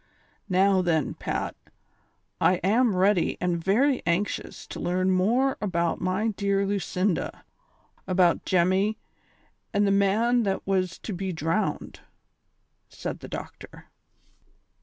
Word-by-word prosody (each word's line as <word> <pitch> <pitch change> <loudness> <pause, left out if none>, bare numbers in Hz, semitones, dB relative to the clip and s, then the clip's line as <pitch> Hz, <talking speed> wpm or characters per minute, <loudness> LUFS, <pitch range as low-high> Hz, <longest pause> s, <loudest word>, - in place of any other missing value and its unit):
Now, 190 +1 +3
then, 165 -4 0
Pat, - - -4 0.8
I 185 - +4
am 220 +2 +3
ready 190 -1 +2
and 175 -2 -1
very 255 - +2
anxious 180 +4 -2
to - - -7
learn 185 +2 0
more 235 +9 +2
about 170 -5 -1
my 190 +5 0
dear 200 -1 0
Lu 200 0 0
cinda, 185 -1 -2 0.6
about 180 -2 +3
Jemmy 190 +4 +2 0.7
and 205 0 +2
the 200 - +2
man 215 +5 +3
that 195 -3 -2
wns 185 -2 -1
to 215 - -4
be 190 +1 -3
drowned," 165 +4 -2 0.9
said - - -6
the - - -9
doctor. - - -9
190 Hz, 120 wpm, -26 LUFS, 180-205 Hz, 0.9 s, I